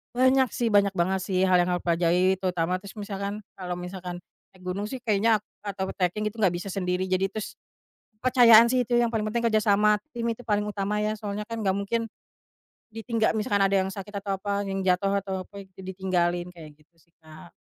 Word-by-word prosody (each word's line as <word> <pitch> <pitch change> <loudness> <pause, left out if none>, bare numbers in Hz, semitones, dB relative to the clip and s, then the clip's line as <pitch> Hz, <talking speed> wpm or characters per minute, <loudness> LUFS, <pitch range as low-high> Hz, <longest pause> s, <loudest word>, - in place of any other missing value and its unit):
Banyak 260 0 +4
sih, 240 - -1
banyak 200 -2 +4
banget 190 +1 0
sih 185 -1 -1
hal 185 - +4
yang 180 - -1
aku 180 - -2
pelajari 175 +2 +3
terutama 180 -2 -1
terus 200 +1 -10
misalkan 200 0 -4 0.2
kalau 180 -2 -5
misalkan 180 0 -6 0.3
naik 185 - -21
gunung 185 +3 -2
sih 250 +5 -5
kayaknya 220 -1 +2 0.2
atau 195 -2 -3
treking 190 +3 0
gitu 215 - -5
gak 190 - +5
bisa 175 +3 -5
sendiri 185 -1 -2
jadi 190 +1 0
terus, 215 0 -6 0.6
kepercayaan 235 -2 +7
sih 250 +1 +2
itu 240 0 +1
yang 240 - +3
paling 225 -2 -1
penting 235 +1 +1
kerja 215 -1 +2
sama 210 0 +4 0.2
tim 235 -1 -3
itu 230 +1 -3
paling 210 -2 0
utama 210 0 -2
ya, 215 0 0
soalnya 210 0 -5
kan 230 -1 -4
gak 195 - +2
mungkin, 225 +2 -2 0.8
ditinggal 225 -1 0
misalkan 205 -2 +1
ada 195 0 +1
yang 190 - -3
sakit 200 +1 -8
atau 195 -1 -2
apa, 200 +1 -2
yang 195 -1 -3
jatuh 195 +2 +2
atau 195 -1 -4
apa 200 - -23 0.2
ditinggalin, 185 -2 -1
kayak 160 -3 -11
gitu 155 +3 -29
sih 170 - -34
Kak. 155 -1 -14
200 Hz, 200 wpm, -26 LUFS, 185-215 Hz, 0.8 s, kepercayaan